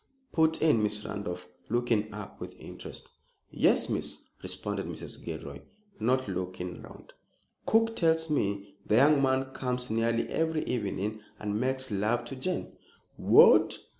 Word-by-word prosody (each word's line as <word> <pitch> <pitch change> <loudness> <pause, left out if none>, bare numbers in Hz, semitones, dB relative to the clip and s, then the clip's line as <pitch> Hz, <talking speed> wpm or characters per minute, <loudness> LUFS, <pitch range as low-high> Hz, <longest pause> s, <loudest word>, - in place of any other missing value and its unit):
put 160 -1 +2
in 150 -9 +4
Miss 105 0 -1
Randolph, 100 -5 -5 0.2
looking 115 -3 +1
up 105 -1 -9
with - - -8
interest. - - -9 0.4
"Yes, - - +3
Miss," - - -3 0.2
responded - - -3
Mrs. - - -8
Gilroy, 70 0 -6 0.4
not 130 +3 +1
looking 90 -1 -4
round. - - -13 0.5
"Cook 225 0 +3
tells 160 -1 +2
me 100 -9 -1
the 105 - +1
young 140 +4 +6
man 135 0 +1
comes 125 -2 -2
nearly 115 +1 +1
every 160 -1 0
evening, 105 -1 -2 0.2
and 105 0 -2
makes 130 -1 0
love 110 +4 0
to 135 - -6
Jane!" 180 +8 -3 0.4
"What! - - +6
115 Hz, 135 wpm, -29 LUFS, 105-135 Hz, 0.5 s, young